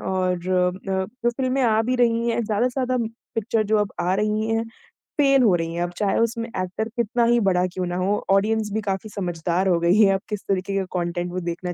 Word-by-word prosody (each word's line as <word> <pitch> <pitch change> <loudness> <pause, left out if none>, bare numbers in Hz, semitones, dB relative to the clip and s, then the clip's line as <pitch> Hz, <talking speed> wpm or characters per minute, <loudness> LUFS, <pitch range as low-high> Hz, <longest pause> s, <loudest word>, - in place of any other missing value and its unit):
और 185 -1 0 0.2
अ, 185 +1 0 0.2
जो 240 - +4
फिल्में 260 0 0
आ 220 -2 +3
भी 250 +3 0
रही 235 -1 +2
हैं, 235 - +1
ज्यादा 215 +3 +1
से 255 +2 -3
ज्यादा 255 0 0 0.4
पिक्चर 225 0 0
जो 215 +1 +2
अब 205 -1 -1
आ 180 +2 +1
रही 210 +2 0
हैं, 225 0 +1 0.5
फेल 275 -3 +4
हो 210 -6 +5
रही 165 -1 -2
हैं 170 - -3
अब 175 - -3
चाहे 205 -2 +1
उसमें 230 0 0
एक्टर 185 +3 -3
कितना 235 0 +1
ही 240 +1 +4
बड़ा 185 -4 +2
क्यों 185 -1 -2
ना 175 - -3
हो, 190 +3 +1
ऑडियंस 215 +2 +2
भी 220 - 0
काफ़ी 200 +1 -3
समझदार 180 -1 -1
हो 175 -2 +3
गई 170 +2 +3
है। 195 -2 +6
अब 195 - -1
किस 210 -2 -3
तरीके 195 0 -1
के 195 -1 0
कंटेंट 175 0 -2
वो 180 - -3
देखना 175 +1 -4
200 Hz, 230 wpm, -23 LUFS, 180-230 Hz, 0.5 s, है